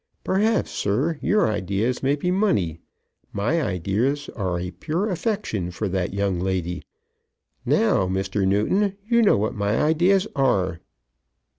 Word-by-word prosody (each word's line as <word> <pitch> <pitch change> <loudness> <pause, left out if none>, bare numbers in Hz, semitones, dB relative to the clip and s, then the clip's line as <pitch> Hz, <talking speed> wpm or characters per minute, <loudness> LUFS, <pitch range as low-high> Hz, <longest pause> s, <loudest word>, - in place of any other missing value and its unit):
Perhaps, 215 +4 +1
sir, 140 +11 -1
your 210 0 +2
ideas 105 +4 -1
may 135 +2 +2
be 180 +5 -1
money; 105 - +1 0.5
my 120 +12 0
ideas 115 - -1
are 90 -4 -2
a 90 0 -4
pure 155 - -2
affection 180 - -2
for 90 +4 -3
that 95 -1 -1
young 100 -2 -1
lady. 90 -1 -2 0.9
Now, 95 - +3
Mr. 95 +1 -1
Newton, 190 - +1
you 235 0 +4
know 210 - +4
what 110 +4 -1
my 105 -1 0
ideas 175 +6 +3
are." 95 -11 +1
105 Hz, 135 wpm, -23 LUFS, -, 0.9 s, you